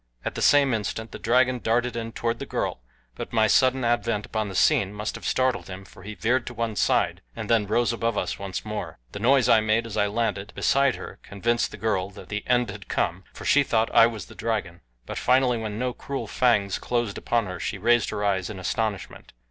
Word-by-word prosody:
At - - -2
the - - -5
same 140 -3 +5
instant 110 +1 -3
the - - -8
dragon 125 +2 +2
darted 120 +2 0
in 115 -1 -4
toward 115 0 -2
the - - -6
girl, - - -2 0.3
but - - -7
my 110 -2 +3
sudden 130 +3 +3
advent 115 -3 0
upon 110 -2 -2
the 95 - -7
scene 95 +2 +3
must 105 0 -3
have - - -6
startled 130 -1 +1
him 95 0 -8
for 95 - -15
he 105 +2 -8
veered 120 +7 0
to 120 - -6
one 115 -1 -2
side, - - +1
and - - -5
then 110 -3 +3
rose 120 +3 +1
above 115 0 -1
us - - -2
once 100 0 -5
more. 105 0 -5
The - - -6
noise 125 +2 +4
I 115 -2 +6
made 110 +2 +1
as 115 - -6
I 105 - +3
landed 105 -2 -2
beside 140 -2 +2
her - - -9
convinced 120 +4 -1
the - - -10
girl 95 -3 -1
that 95 -2 -13
the 105 0 -3
end 125 -1 +2
had - - -10
come, 90 +2 -1
for - - -10
she 145 - +5
thought 115 -4 0
I 115 - +7
was 110 -3 -6
the - - -14
dragon; 105 -7 -3 0.2
but - - -5
finally 125 -1 +3
when 110 -2 -4
no 125 +1 -1
cruel 140 +2 -5
fangs 105 -6 +1
closed 120 -4 -2
upon 120 -2 0
her 90 -2 -6
she 100 - -3
raised 120 +3 +3
her 105 - -2
eyes 95 -3 0
in 105 - -7
astonishment. 95 +3 -3
115 Hz, 230 wpm, -25 LUFS, 100-120 Hz, 0.3 s, I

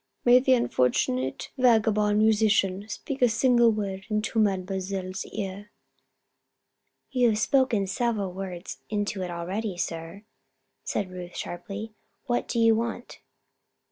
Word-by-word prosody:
"May 245 +1 +7
the 260 0 +3
unfortunate 130 - 0
vagabond 215 -4 +3
musician 210 -2 +2
speak 265 +6 -5
a 245 - +6
single 240 +1 +4
word 195 -3 -4
into 215 +1 0
Mademoiselle's 190 -1 -1
ear?" 200 0 -6 1.4
"You 250 -3 +3
have 215 - +1
spoken 245 -3 +2
several 205 -2 -1
words 185 -2 -6
into 205 -2 -2
it 180 - -3
already, 185 +4 -4
sir," 165 +3 -5 0.6
said 190 -3 -2
Ruth, 180 -1 -8
sharply. 205 +5 -6 0.3
"What 240 -1 -1
do - - -3
you 230 -1 +5
want?" 235 +2 -3
210 Hz, 120 wpm, -26 LUFS, 190-230 Hz, 1.4 s, May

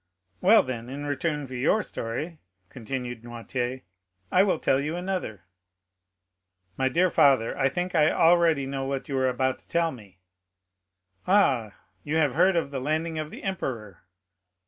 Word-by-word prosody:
"Well, 215 +4 +6
then, 120 -2 -6
in 140 +2 -6
return 150 0 -2
for 130 - -10
your 140 +12 +1
story," 150 +9 -5 0.3
continued 125 -1 -5
Noirtier, 120 +2 -4 0.5
"I 185 - +5
will 195 -4 +2
tell 135 - +2
you 150 +4 -2
another." 180 - -4 1.3
"My 130 0 +1
dear 175 +6 +2
father, 135 -5 +4
I 135 -1 +2
think 180 +5 -3
I 155 0 +4
already 165 -4 +3
know 135 0 -3
what 135 0 -3
you 140 - -3
are 130 0 +2
about 130 +1 -1
to - - -24
tell 170 -1 +1
me." 105 - -14 1.1
"Ah, 135 - +3 0.3
you 150 +2 -3
have 145 -5 +2
heard 180 +4 +3
of 165 -4 -1
the 135 -2 -4
landing 160 +3 -1
of 155 -1 -4
the - - -10
emperor?" 120 - -4
140 Hz, 160 wpm, -26 LUFS, 125-165 Hz, 1.3 s, Well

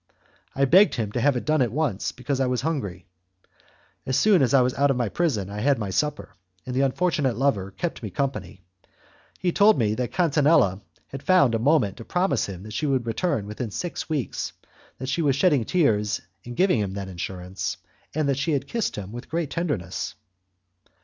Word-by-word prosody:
I 140 - +3
begged 190 +9 +5
him 110 -4 -2
to 120 - -2
have 145 0 +3
it - - -5
done 155 -1 +2
at 120 -4 +1
once, 135 -7 -1
because 135 +2 -3
I 135 - +2
was 125 -1 0
hungry. 115 - -3 1.0
As 130 - 0
soon 205 -6 +5
as 130 - +3
I 135 -2 +6
was 125 0 +1
out 140 +1 +2
of 135 - +1
my 120 -4 0
prison 125 - 0
I 100 +1 -6
had 140 +5 +2
my 105 -4 -3
supper, 145 -5 -2 0.3
and 125 - -4
the 135 - +2
unfortunate 140 -3 +1
lover 115 -8 +1
kept 165 - -4
me 110 - -5
company. 130 -4 -4 0.7
He 180 - 0
told 205 +4 +5
me 105 -3 +1
that 120 +1 -2
Catinella 145 - +3 0.3
had 135 - -7
found 180 -10 +4
a 115 - +1
moment 120 -6 +2
to 115 - -8
promise 175 - 0
him 95 -2 -7
that 110 0 -9
she 150 +8 -1
would 130 -4 +1
return 115 - -1
within 105 +3 -5
six 170 - -5
weeks, 145 -7 -2 0.4
that 130 - -6
she 140 +6 0
was 140 -4 +2
shedding 145 -6 +3
tears 105 - +1 0.2
in 120 0 -8
giving 185 - +3
him 100 -2 -2
that 100 -1 -4
assurance, 90 +1 -5 0.4
and 155 -2 +1
that 140 -1 +1
she 155 +3 0
had 140 -1 -1
kissed 230 -3 -2
him 100 -1 -6
with 120 +2 -8
great 165 -3 -2
tenderness. 140 - -3
130 Hz, 205 wpm, -25 LUFS, 105-150 Hz, 1.0 s, I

